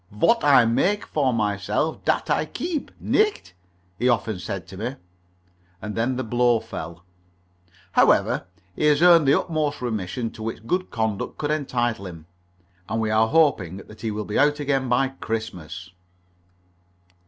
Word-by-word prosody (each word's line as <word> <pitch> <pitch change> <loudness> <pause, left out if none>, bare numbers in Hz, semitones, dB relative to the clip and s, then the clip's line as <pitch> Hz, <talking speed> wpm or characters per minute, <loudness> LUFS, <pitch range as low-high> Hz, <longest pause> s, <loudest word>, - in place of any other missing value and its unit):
"Vot 230 - +2
I 135 -5 +6
maig 190 - +1
for 140 -4 0
myself, 105 - -1
dat - - +1
I - - +1
keeb, 330 -4 -4
nicht?" 425 - 0 0.5
he 125 - +2
often 110 -4 0
said 90 0 -5
to - - -10
me. 120 +6 -4 0.8
And 105 +1 -6
then 120 +4 0
the 130 - -2
blow 120 0 +2
fell. 85 -6 -8 0.9
However, - - +3 0.3
he - - 0
has 150 +2 +4
earned 170 -4 +7
the 140 - +5
utmost 155 -4 -2
remission 115 -1 -3
to - - -12
which 110 0 -5
good 185 +9 -1
conduct 110 -3 -2
could 150 0 -2
entitle 120 -8 -1
him, 85 -3 -10 0.6
and 110 +2 -1
we 110 -1 0
are 110 +1 +4
hoping 110 - +2
that 105 +2 -13
he 115 - -2
will 105 0 -4
be 105 - -1
out 145 +1 +3
again 135 -3 0
by 130 +2 +2
Christmas. 95 - -6
115 Hz, 155 wpm, -24 LUFS, 105-145 Hz, 0.9 s, earned